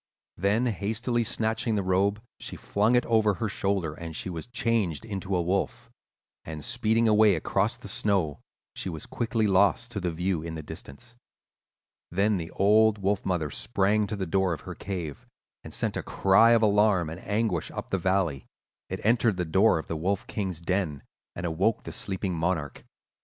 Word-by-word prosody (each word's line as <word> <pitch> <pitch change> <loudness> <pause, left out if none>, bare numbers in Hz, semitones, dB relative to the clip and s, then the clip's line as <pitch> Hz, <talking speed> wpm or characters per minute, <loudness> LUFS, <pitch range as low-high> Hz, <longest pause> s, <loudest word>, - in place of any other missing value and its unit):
"Then 100 +7 +2
hastily 115 +3 0
snatching 110 +1 -1
the 100 - 0
robe 100 +4 +1 0.2
she - - -6
flung 105 +4 +1
it 125 - +3
over 110 -3 +3
her 110 - -2
shoulders, 95 -6 -2
and 80 -1 -6
she 95 - -4
was 80 +2 -6
changed 115 -7 -1
into 100 -3 -3
a 90 - +2
wolf, 95 +3 -2 0.5
and, 80 -1 -7
speeding 115 -1 +2
away 105 -2 +5
across 80 - 0
the - - -10
snow, 95 -8 0 0.3
she - - -3
was 80 -3 -6
quickly 115 -2 -1
lost 100 +4 +3
to 105 - -3
view 90 -1 -1
in 80 0 -6
the 80 - -6
distance. 120 +14 -10 0.9
Then 100 +3 +2
the 85 -1 -5
old 105 +3 +4
wolf 100 0 0
mother 85 -5 -1
sprang 105 - +1
to 105 - -3
the 95 -2 -3
door 95 +1 +1
of 75 - -6
her - - -7
cave 90 -8 -6 0.4
and - - -9
sent - - -2
a - - -1
cry 105 +5 +4
of 115 -1 +4
alarm 105 -4 +3
and 85 +3 -8
anguish 105 -5 -1
up - - -7
the 95 - +1
valley. 90 -6 0 0.4
It - - -4
entered 115 -2 +3
the 90 - -1
door 95 +5 +4
of 80 - -4
the 80 - -4
Wolf 95 +5 -1
King's 95 -6 -3
den, 85 -5 -1 0.3
and 85 - -4
awoke 90 +7 +1
the - - -7
sleeping 95 -1 -2
monarch. 80 -3 -2
100 Hz, 180 wpm, -27 LUFS, 85-110 Hz, 0.9 s, away